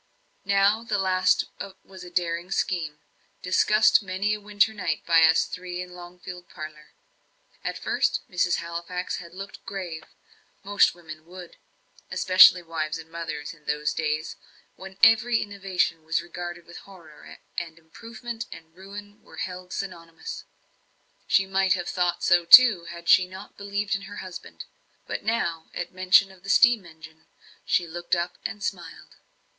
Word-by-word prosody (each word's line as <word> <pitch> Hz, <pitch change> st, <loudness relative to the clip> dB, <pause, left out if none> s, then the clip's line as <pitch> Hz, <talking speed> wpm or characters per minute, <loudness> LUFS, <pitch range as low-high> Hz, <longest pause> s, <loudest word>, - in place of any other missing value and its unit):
Now 200 Hz, +3 st, +3 dB
the 220 Hz, -3 st, -1 dB
last 185 Hz, -1 st, +2 dB, 0.4 s
was 190 Hz, -1 st, -12 dB
a 180 Hz, -, -10 dB
daring 175 Hz, 0 st, -2 dB
scheme, 165 Hz, -5 st, -2 dB, 0.5 s
discussed 210 Hz, +5 st, +4 dB
many 195 Hz, +2 st, -1 dB
a 210 Hz, -, -5 dB
winter 205 Hz, +1 st, +2 dB
night 200 Hz, -4 st, -3 dB
by 165 Hz, -1 st, +5 dB
us 160 Hz, 0 st, +4 dB
three 180 Hz, -1 st, -6 dB
in 180 Hz, 0 st, -7 dB
Longfield 180 Hz, 0 st, -10 dB
parlour. 155 Hz, -2 st, -10 dB, 0.7 s
At -, -, -3 dB
first, -, -, 0 dB
Mrs. 180 Hz, -4 st, +1 dB
Halifax 170 Hz, +2 st, -4 dB
had 170 Hz, 0 st, -11 dB
looked 195 Hz, +2 st, -9 dB
grave 180 Hz, -5 st, -6 dB, 0.6 s
most 205 Hz, -3 st, +3 dB
women 155 Hz, -2 st, -12 dB
would, 180 Hz, -1 st, -11 dB, 0.5 s
especially 185 Hz, -1 st, +6 dB
wives 165 Hz, -2 st, -3 dB
and 165 Hz, 0 st, -12 dB
mothers, 165 Hz, -3 st, -5 dB
in 150 Hz, -2 st, -22 dB
those 150 Hz, +1 st, -1 dB
days 155 Hz, 0 st, -2 dB, 0.4 s
when 190 Hz, 0 st, -11 dB
every 225 Hz, +1 st, +6 dB
innovation 195 Hz, -5 st, -2 dB
was 160 Hz, +1 st, 0 dB
regarded 175 Hz, 0 st, -7 dB
with 170 Hz, -, -12 dB
horror, 170 Hz, -6 st, -14 dB, 0.2 s
and 165 Hz, -2 st, -8 dB
improvement 230 Hz, +7 st, -8 dB
and 160 Hz, 0 st, -12 dB
ruin 205 Hz, +2 st, -11 dB
were -, -, -16 dB
held 180 Hz, 0 st, -6 dB
synonymous. 170 Hz, -4 st, -7 dB, 0.8 s
She 195 Hz, -, +3 dB
might 190 Hz, 0 st, +2 dB
have 175 Hz, -3 st, -3 dB
thought 180 Hz, -1 st, -1 dB
so 175 Hz, 0 st, +4 dB
too, 200 Hz, -1 st, +8 dB
had 170 Hz, 0 st, -10 dB
she 180 Hz, +1 st, +6 dB
not 190 Hz, +2 st, -11 dB
believed 200 Hz, 0 st, -3 dB
in 195 Hz, -, -1 dB
her 205 Hz, -, -9 dB
husband. 185 Hz, -1 st, -9 dB, 0.4 s
But -, -, -4 dB
now, 170 Hz, -8 st, -1 dB
at 175 Hz, -, -4 dB
mention 185 Hz, +1 st, +4 dB
of 190 Hz, -1 st, -18 dB
the 195 Hz, -, -9 dB
steam 230 Hz, -3 st, +5 dB
engine, 160 Hz, -1 st, -15 dB, 0.4 s
she 175 Hz, -, +2 dB
looked 175 Hz, +2 st, -2 dB
up 175 Hz, +1 st, -3 dB
and 215 Hz, -2 st, -5 dB
smiled. -, -, -6 dB
180 Hz, 150 wpm, -25 LUFS, 170-195 Hz, 0.8 s, too